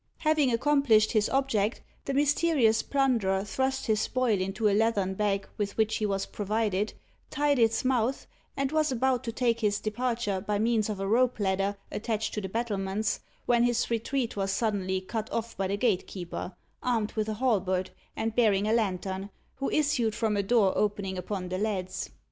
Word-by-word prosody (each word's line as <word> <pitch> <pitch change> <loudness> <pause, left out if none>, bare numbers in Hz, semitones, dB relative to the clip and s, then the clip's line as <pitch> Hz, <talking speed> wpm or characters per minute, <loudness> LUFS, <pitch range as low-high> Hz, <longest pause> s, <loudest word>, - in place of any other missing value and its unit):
Having 305 -4 +2
accomplished 230 -4 +3
his 215 -2 +2
object, 245 -6 +1 0.3
the 275 - -2
mysterious 285 -5 +3
plunderer 230 -9 +1
thrust 265 +5 -1
his 215 -2 +1
spoil 240 -6 +1
into 195 +3 0
a 205 - +3
leathern 205 -3 +2
bag 200 0 0
with 200 -1 -2
which 220 0 +2
he 215 - 0
was 195 -1 -1
provided, 210 -1 -1 0.3
tied 290 -2 +1
its 225 +2 +2
mouth, 255 0 +1 0.3
and 275 0 0
was 310 -2 +2
about 255 0 +1
to 230 - -3
take 235 -1 +1
his 210 -2 +1
departure 215 -2 -1
by 205 +1 -1
means 220 0 +1
of 205 -2 -3
a 195 - -2
rope 240 +4 +2
ladder 195 0 0
attached 220 0 -2
to 210 - -2
the 190 - -5
battlements, 205 -2 -1 0.3
when 240 -1 +3
his 240 -1 +1
retreat 235 +2 -1
was 195 -1 -1
suddenly 195 -4 0
cut 220 +3 -4
off 230 0 -3
by 195 -1 -1
the 200 +2 -1
gatekeeper, 185 -4 -2 0.3
armed 230 -4 0
with 215 -1 -2
a 215 - -2
halberd, 190 -6 0 0.2
and 225 0 -2
bearing 210 -4 +3
a 220 - +2
lantern, 195 -3 -1 0.3
who 275 - -1
issued 280 -8 +1
from 225 -2 0
a 200 - +2
door 200 -2 +3
opening 200 -2 -1
upon 185 0 -4
the 185 +1 -2
leads. 195 -3 -2
220 Hz, 175 wpm, -28 LUFS, 200-240 Hz, 0.3 s, accomplished